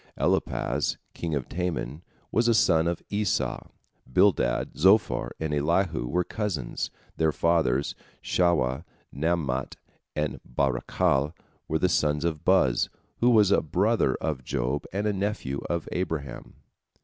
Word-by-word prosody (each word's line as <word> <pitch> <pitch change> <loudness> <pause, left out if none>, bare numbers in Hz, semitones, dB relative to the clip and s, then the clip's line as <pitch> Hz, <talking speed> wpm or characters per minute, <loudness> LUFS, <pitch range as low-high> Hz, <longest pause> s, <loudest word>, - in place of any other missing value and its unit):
Eliphaz, - - 0 0.2
king 80 -3 -3
of 70 -3 -3
Teman, 85 -5 -3 0.3
was 115 +1 +2
a 115 - +4
son 80 -5 +4
of 85 -1 -2
Esau; 105 -1 -1 0.4
Bildad, - - +2
Zophar, 95 +7 +3
and 80 -1 -2
Elihu 80 -1 +1
were 90 +8 +1
cousins, 90 - -3 0.3
their 80 -1 +3
fathers, 75 -5 +1 0.3
Shuah, 75 -8 +1 0.3
Naamat, 70 -4 -1 0.4
and 75 -1 -2
Barachel, 70 +3 0 0.3
were 80 - +1
the 90 - +2
sons 75 -2 +1
of 80 -3 -2
Buz, 90 -10 +3 0.3
who 120 - +4
was 105 -4 +5
a - - +4
brother 90 - +1
of 75 -5 -3
Job 65 +4 -2
and 100 +2 -2
a 105 - +1
nephew 95 -9 -2
of 85 -2 -2
Abraham. 80 -7 -4
80 Hz, 130 wpm, -27 LUFS, 70-95 Hz, 0.4 s, was